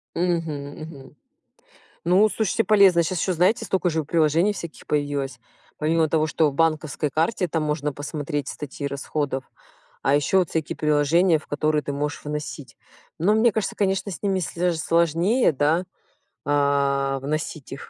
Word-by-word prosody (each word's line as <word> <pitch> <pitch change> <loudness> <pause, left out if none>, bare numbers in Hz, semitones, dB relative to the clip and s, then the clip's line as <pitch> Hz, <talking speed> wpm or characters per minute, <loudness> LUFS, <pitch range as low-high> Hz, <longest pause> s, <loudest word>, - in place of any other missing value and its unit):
Мгм, 165 -5 -1
мгм. 145 -3 -11 0.9
Ну, 185 +5 +5
слушайте, 220 +1 0
полезно. 195 -5 +5
Сейчас 170 +1 -2
ещё, 185 - 0
знаете, 180 +6 +2
столько 185 -2 0
же 160 -1 -1
приложений 165 +5 +2
всяких 170 -5 -9
появилось. 145 -3 -2 0.4
Помимо 160 +1 +2
того, 155 0 +1
что 155 -1 +2
в - - -11
банковской 155 -2 0
карте 170 +4 0
там 160 0 -1
можно 150 -1 -1
посмотреть 145 0 -4
статьи 145 0 -6
расходов. 140 -1 -3 0.6
А 135 - +2
ещё 145 +6 +3
вот 180 -3 +1
всякие 160 -2 -2
приложения, 155 +3 +3
в 150 - -16
которые 150 +1 0
ты 140 - -4
можешь 145 +1 -3
вносить. 150 -4 -6 0.4
Но 195 +7 +3
мне 230 +2 +4
кажется, 215 -1 -2
конечно, 195 0 0
с 165 - -9
ними 195 -2 +1
слё 175 +1 -2
даже 170 -2 0
сложнее, 170 - +2
да, 155 +6 +1 0.6
а, 140 -1 +1
вносить 150 +1 -4
их, 135 - -8
155 Hz, 160 wpm, -23 LUFS, 145-175 Hz, 0.9 s, Ну